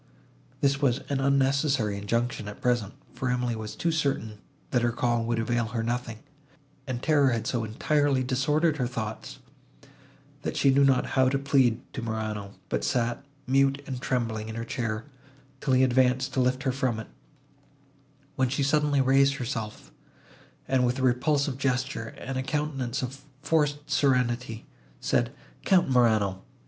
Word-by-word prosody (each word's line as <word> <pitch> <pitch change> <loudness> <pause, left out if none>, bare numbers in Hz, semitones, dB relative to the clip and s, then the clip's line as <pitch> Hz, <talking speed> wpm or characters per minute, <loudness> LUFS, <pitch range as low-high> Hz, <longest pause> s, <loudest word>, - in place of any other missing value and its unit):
This 140 0 +2
was 135 -2 +2
an 140 -1 0
unnecessary 135 -4 +2
injunction, 115 +2 -2
at 105 - -8
present; 120 -5 0 0.2
for 130 - -2
Emily 125 -1 0
was 110 -1 -6
too 170 - 0
certain, 135 -9 -1 0.3
that 125 - +2
her 120 0 +2
call 120 0 0
would 120 0 0
avail 120 0 0
her 115 0 -3
nothing; 120 -1 -3 0.7
and 125 -1 -4
terror 145 -3 +4
had 115 -3 -1
so 120 -3 -1
entirely 135 +4 +1
disordered 150 +5 +1
her 125 -3 0
thoughts, 110 -3 -5 1.0
that - - -3
she 135 - +4
knew 140 +1 +4
not 135 -2 +4
how 130 -1 +4
to 135 - +1
plead 135 -4 +2
to 130 - -4
Morano, 110 -3 -4
but - - -2
sat, 120 +1 0 0.2
mute 135 +1 +2
and 130 -2 -5
trembling, 115 -5 -2
in 110 - -6
her 115 0 -4
chair, 115 -2 -3 0.5
till 135 - 0
he 130 0 +5
advanced 130 0 +2
to - - 0
lift 130 +1 +1
her 135 - +1
from 125 -3 -1
it, 110 - -6 1.3
when 130 -1 +1
she 140 +2 0
suddenly 145 0 +2
raised 135 +1 +4
herself, 115 -5 -5 0.8
and, 130 -1 +2
with 125 +1 +1
a 130 - -2
repulsive 135 +2 +1
gesture, 130 -3 -1
and 130 0 -4
a - - 0
countenance 135 -3 -2
of 135 +2 -6 0.2
forced 145 -1 +1
serenity, 125 -4 +1 0.3
said, - - +1 0.3
"Count 180 -7 +3
Morano! 110 -6 +3
130 Hz, 160 wpm, -27 LUFS, 115-140 Hz, 1.3 s, he